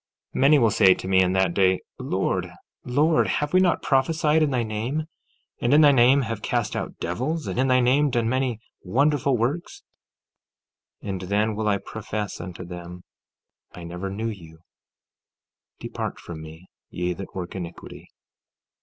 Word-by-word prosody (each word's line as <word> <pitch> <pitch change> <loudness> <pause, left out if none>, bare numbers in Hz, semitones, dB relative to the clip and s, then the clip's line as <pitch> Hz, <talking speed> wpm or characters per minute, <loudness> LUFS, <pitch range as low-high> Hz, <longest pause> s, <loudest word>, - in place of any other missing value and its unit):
14:22 - - -2
Many 145 +3 +6
will 115 -5 +3
say 95 -2 +6
to - - -7
me 95 0 +4
in 90 0 +2
that 95 -2 +2
day: 95 -1 +3 0.2
Lord, - - -1 0.3
Lord, 150 +6 +2
have 150 +2 -1
we 185 - +6
not 185 -2 +2
prophesied 150 +3 +2
in 155 - +3
thy 125 -3 0
name, 115 +8 -3 0.6
and 120 +4 +3
in 155 - +7
thy 145 -2 +7
name 130 +1 +5
have 115 -2 -4
cast - - -1
out - - -4
devils, 145 - -3
and - - -3
in 130 - +2
thy 130 -1 +4
name 140 +4 +3
done 120 -3 0
many 130 -2 -1 0.2
wonderful 140 +5 +1
works? 135 +10 -3 1.2
14:23 - - -6
And 95 -1 -4
then 105 +2 +1
will 110 0 -2
I 100 -1 +2
profess 105 0 -5
unto 90 0 -8
them: 90 0 -9 0.7
I 90 - -9
never 90 +3 -5
knew 110 +4 -3
you; 80 -6 -11 1.2
depart - - -5
from 80 -2 -9
me, 80 +3 -11 0.2
ye 90 0 -2
that 95 +2 -9
work 90 -2 -5
iniquity. 90 -3 -9
110 Hz, 170 wpm, -24 LUFS, 95-135 Hz, 1.2 s, in